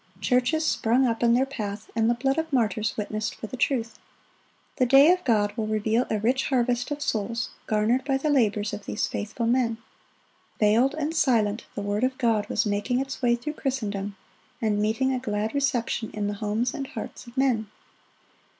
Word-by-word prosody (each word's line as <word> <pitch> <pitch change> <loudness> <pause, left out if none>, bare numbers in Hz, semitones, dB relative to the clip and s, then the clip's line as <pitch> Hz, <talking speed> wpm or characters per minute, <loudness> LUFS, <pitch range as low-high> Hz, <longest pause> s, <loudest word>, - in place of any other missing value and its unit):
Churches 250 +10 +1
sprung 245 +1 +2
up 230 -2 -1
in 235 0 +4
their 260 +2 +3
path, 210 -6 -6
and 225 0 +2
the 240 - +3
blood 270 +5 0
of 320 0 -3
martyrs 220 -4 0
witnessed 215 0 -3
for - - -7
the 220 - -7
truth. 240 -2 -1 0.8
The 255 - +3
day 275 +6 +7
of 365 - -3
God 210 -5 +1
will 220 -2 -2
reveal 220 +3 +1
a 215 - +1
rich 250 +6 +1
harvest 245 -2 0
of 290 0 -3
souls 225 +2 -2 0.2
garnered 220 +4 +2
by 270 -1 +1
the 295 +3 0
labors 210 -6 +1
of 205 -1 -7
these - - -1
faithful 215 +3 -3
men. 235 -1 +1 0.8
Veiled 225 +6 +3
and 310 +1 -2
silent, 225 -7 +2
the 205 - -3
word 205 +3 -1
of 260 0 0
God 225 -4 +1
was 215 - +1
making 205 +5 0
its 270 0 -4
way 240 -1 +3
through 270 +6 -5
Christendom, 205 -9 -3 0.4
and 210 -2 0
meeting 230 +5 +1
a 255 - -1
glad 215 -3 -2
reception 250 -5 0
in 210 -1 -2
the 205 - -1
homes 215 +4 -1
and 275 -3 -4
hearts - - -8
of 240 +2 -14
men. 240 -6 +1
235 Hz, 190 wpm, -26 LUFS, 215-260 Hz, 0.8 s, day